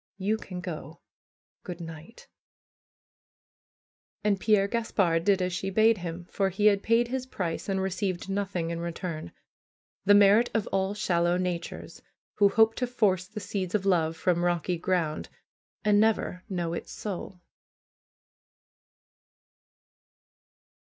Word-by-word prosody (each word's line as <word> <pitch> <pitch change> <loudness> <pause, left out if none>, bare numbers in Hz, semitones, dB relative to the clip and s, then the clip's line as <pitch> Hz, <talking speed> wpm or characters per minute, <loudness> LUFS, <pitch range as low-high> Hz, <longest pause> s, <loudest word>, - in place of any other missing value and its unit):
You 205 +3 0
can 180 -4 -7
go! 165 -3 -7 0.6
Good 180 -2 -7
night 165 +5 -10 1.3
!" - - -60
And 205 -2 +2
Pierre 210 -2 +3
Gaspard 195 -7 +1
did 195 -1 +3
as 180 0 -2
she 195 +2 -2
bade 220 +2 +4
him, 175 0 -6
for 195 -1 +1
he 195 +3 -1
had 200 -2 +5
paid 230 +2 +2
his 260 0 -3
price 180 -6 -4
and 190 -1 0
received 190 -1 -2
nothing 195 -4 -2
in 170 - -3
return; 170 - -5 0.7
the 205 +2 +6
merit 205 +4 +6
of 225 - +1
all 195 +1 0
shallow 175 -3 +1
natures, 180 -2 -4 0.4
who 200 -1 +6
hope 220 +2 +4
to 250 - 0
force 200 -7 +1
the 210 +3 -7
seeds 190 -2 -3
of 200 -2 0
love 165 -4 +2
from 175 -1 +1
rocky 175 0 0
ground, 165 -4 -1 0.6
and 205 -1 +5
never 215 -4 +1
know 175 -3 -2
its - - -6
soul. 190 -2 -6
190 Hz, 135 wpm, -28 LUFS, 175-205 Hz, 1.3 s, the